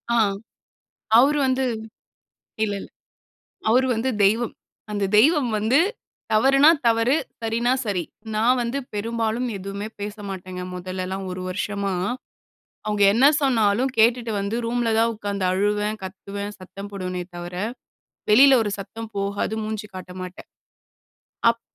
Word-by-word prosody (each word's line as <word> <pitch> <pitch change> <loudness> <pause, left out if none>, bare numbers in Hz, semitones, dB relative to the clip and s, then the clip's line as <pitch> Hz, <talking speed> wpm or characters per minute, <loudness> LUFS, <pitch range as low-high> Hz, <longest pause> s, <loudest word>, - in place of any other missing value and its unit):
ஆ. - - +3 1.0
அவரு 285 +4 +5
வந்து 260 0 +1 1.0
இல்ல, 205 - -2
இல்ல. - - -9 0.8
அவரு 255 +4 +4
வந்து 245 +4 0 0.2
தெய்வம். 225 +4 +2 0.4
அந்த 205 -1 0
தெய்வம் 285 +1 +5
வந்து 225 +8 +3 0.5
தவறுனா, 275 +6 +6 0.2
தவறு. 230 +4 +3 0.3
சரின்னா 230 +2 +1
சரி. 190 -5 -1 0.3
நான் 245 +4 +3
வந்து 240 +3 -2 0.2
பெரும்பாலும் 225 +3 -1
எதுவுமே 195 +2 -5
பேச 205 +1 -4
மாட்டேங்க, 185 -1 -6
முதல்லலாம் 185 +1 -4
ஒரு 185 - -5
வருஷமா. 200 +1 -2 0.9
அவுங்க 210 -1 +1
என்ன 245 +5 +4 0.2
சொன்னாலும், 240 -2 +2
கேட்டுட்டு 230 +1 +3
வந்து 200 +3 -2
ரூம்ல 235 -1 0
தான் 230 +1 +3
உக்காந்து 200 -2 -3
அழுவேன், 210 +2 0
கத்துவேன், 200 +2 -6
சத்தம் 195 +2 -9
போடுவேனே 185 -2 -4
தவர, 175 +1 -7 0.8
வெளியில 265 +2 +8
ஒரு 205 - -2
சத்தம் 225 +3 -7
போகாது. 200 +2 -1
மூஞ்சி 215 -1 -4
காட்ட 185 0 -8
மாட்டேன். 185 0 -9 1.0
அப் 230 0 -4
215 Hz, 125 wpm, -23 LUFS, 195-235 Hz, 1.0 s, வெளியில